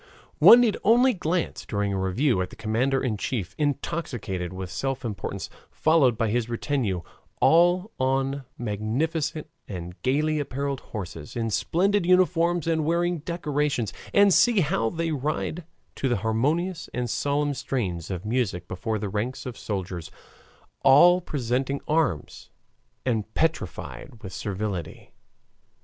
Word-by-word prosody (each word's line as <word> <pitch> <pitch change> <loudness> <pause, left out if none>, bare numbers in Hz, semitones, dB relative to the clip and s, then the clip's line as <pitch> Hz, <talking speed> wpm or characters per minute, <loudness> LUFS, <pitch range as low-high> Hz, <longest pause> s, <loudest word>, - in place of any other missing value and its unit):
One 240 - +10
need 225 -4 +2
only 245 +4 +5
glance 175 -2 -2
during 100 -2 -1
a 95 - -1
review 95 +4 +1
at 90 - -3
the - - -12
commander 120 +5 0
in 115 -5 -1
chief, 100 -3 -3
intoxicated 130 - -2
with 95 -1 -6
self 135 +2 -3
importance, 105 -5 -4 0.2
followed 145 -8 +3
by 115 -1 +1
his 120 0 0
retinue, 115 - -1 0.4
all 175 +5 +4
on 135 +1 0
magnificent 140 +9 -2 0.2
and 90 -3 -6
gayly 150 +4 +1
appareled 140 -1 -2
horses, 85 -8 -8
in 115 -2 -1
splendid 190 - +1
uniforms 175 -2 +3
and 160 -1 +1
wearing 170 +2 +1
decorations, 150 - -1 0.2
and 200 -1 +5
see 235 -1 +5
how 115 -7 +1
they 165 +3 -2
ride 155 +3 -2 0.3
to 135 - 0
the 120 - +1
harmonious 155 +11 0
and 125 0 -1
solemn 145 +4 0
strains 95 - -3
of 95 0 -4
music 105 -7 -1
before 110 +5 -3
the 105 0 -3
ranks 110 +8 -3
of 125 -3 -5
soldiers, 90 -6 -4 0.7
all 175 +7 +7
presenting 135 -2 -1
arms 150 - -1 0.6
and 110 -4 -1
petrified 120 - -3
with 95 -2 -7
servility. 95 -5 -4
135 Hz, 135 wpm, -26 LUFS, 105-160 Hz, 0.7 s, One